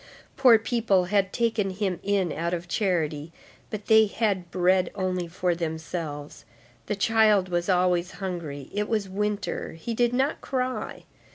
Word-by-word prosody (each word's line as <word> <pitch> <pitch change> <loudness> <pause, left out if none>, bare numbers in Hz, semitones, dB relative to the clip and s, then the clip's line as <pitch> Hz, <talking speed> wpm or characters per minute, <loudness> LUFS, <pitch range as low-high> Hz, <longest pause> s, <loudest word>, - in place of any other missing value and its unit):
Poor 250 -4 +7
people 225 -5 +1
had 195 0 +1
taken 225 -4 0
him 190 -2 -2
in 195 -4 0
out 170 +3 -1
of 175 +1 -7
charity, 165 -6 -1 0.4
but 210 -1 -6
they 220 -1 +6
had 200 -5 -1
bread 185 0 +2
only 185 -3 -2
for 180 +1 -1
themselves. 160 -2 -5 0.4
The - - -1
child 215 -2 +3
was 175 +1 -1
always 180 -1 +2
hungry. 170 -8 -6
It 210 +1 -1
was 215 -3 0
winter. 205 +1 -3
He 165 +9 -5
did 240 +1 +2
not 265 +4 0
cry. 255 -1 -3
190 Hz, 150 wpm, -26 LUFS, 175-215 Hz, 0.4 s, Poor